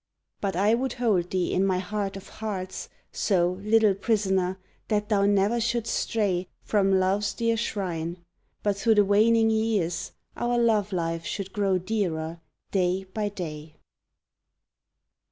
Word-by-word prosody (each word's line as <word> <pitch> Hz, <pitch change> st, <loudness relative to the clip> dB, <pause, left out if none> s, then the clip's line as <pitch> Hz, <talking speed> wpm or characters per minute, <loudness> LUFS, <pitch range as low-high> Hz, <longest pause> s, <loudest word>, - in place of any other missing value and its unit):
But 195 Hz, -3 st, -2 dB
I 205 Hz, +4 st, +3 dB
would 250 Hz, +1 st, 0 dB
hold 205 Hz, -8 st, +1 dB
thee 185 Hz, -2 st, 0 dB
in 185 Hz, -, +2 dB
my 190 Hz, -2 st, +2 dB
heart 195 Hz, +1 st, -3 dB
of 195 Hz, -, -11 dB
hearts 195 Hz, -4 st, -5 dB, 0.2 s
So 180 Hz, -2 st, +1 dB
little 215 Hz, 0 st, +4 dB
prisoner, 190 Hz, -3 st, 0 dB, 0.3 s
that 210 Hz, -1 st, 0 dB
thou 200 Hz, -2 st, +3 dB
ne'er 205 Hz, +4 st, +2 dB
shouldst 235 Hz, 0 st, 0 dB
stray 190 Hz, -5 st, 0 dB, 0.2 s
From 195 Hz, -2 st, +2 dB
Love's 195 Hz, +2 st, +1 dB
dear 230 Hz, -1 st, +1 dB
shrine, 180 Hz, -7 st, -3 dB, 0.5 s
but, 205 Hz, -1 st, +1 dB
through 220 Hz, +3 st, +3 dB
the 205 Hz, -1 st, +5 dB
waning 225 Hz, +3 st, +4 dB
years 205 Hz, -7 st, 0 dB, 0.2 s
Our 240 Hz, 0 st, 0 dB
love 220 Hz, -4 st, +2 dB
life 165 Hz, -2 st, -2 dB
should 195 Hz, +1 st, -5 dB
grow 195 Hz, -2 st, +2 dB
dearer 170 Hz, -5 st, -2 dB, 0.3 s
day 185 Hz, 0 st, +1 dB
by 210 Hz, -1 st, -1 dB
day! 155 Hz, -6 st, -7 dB
200 Hz, 140 wpm, -26 LUFS, 185-220 Hz, 0.5 s, the